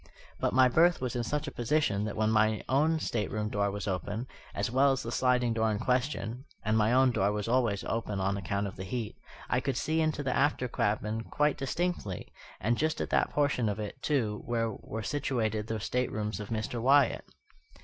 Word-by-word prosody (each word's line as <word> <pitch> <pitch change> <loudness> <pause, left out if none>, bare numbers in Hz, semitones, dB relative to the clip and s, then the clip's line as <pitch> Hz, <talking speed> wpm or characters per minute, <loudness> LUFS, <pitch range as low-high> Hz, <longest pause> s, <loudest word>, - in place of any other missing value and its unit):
But - - +1
my 130 +1 +6
berth 165 +7 +4
was 125 -1 -3
in 120 - 0
such 150 +5 -2
a - - -4
position 120 -5 +1
that 105 - -4
when 110 0 +1
my 110 0 +2
own 155 +5 +3
stateroom 105 -5 -2
door 100 -1 0
was 105 +1 -4
open, 100 +5 -2 0.3
as 115 - -1
well 135 +2 +4
as 135 - -3
the 115 - -4
sliding 125 -2 +2
door 110 0 +1
in 105 - 0
question 125 +1 -1 0.2
(and 110 +1 +2
my 110 0 +3
own 130 +1 +5
door 100 -3 +1
was 105 0 -3
always 115 -5 +1
open 110 -3 -2
on 95 +1 0
account 100 +1 -2
of 100 - -6
the 95 - -5
heat), 110 +3 -4 0.3
I 125 - +2
could 130 -1 -2
see 160 +3 +1
into 155 -2 0
the 130 -2 0
after 140 -2 +2
cabin 110 0 -1
quite 150 0 +1
distinctly, 140 - -3 0.3
and 115 +4 0
just 155 +1 0
at - - -3
that - - +3
portion 140 -6 +1
of 105 - -3
it, 105 +5 -6
too, 115 -8 0
where 115 -1 0
were 110 +1 -6
situated 110 -6 -1
the 110 -1 -2
staterooms 110 -2 -2
of 105 - -6
Mr. 115 +1 -2
Wyatt. 140 +3 +4
115 Hz, 205 wpm, -30 LUFS, 105-130 Hz, 0.3 s, my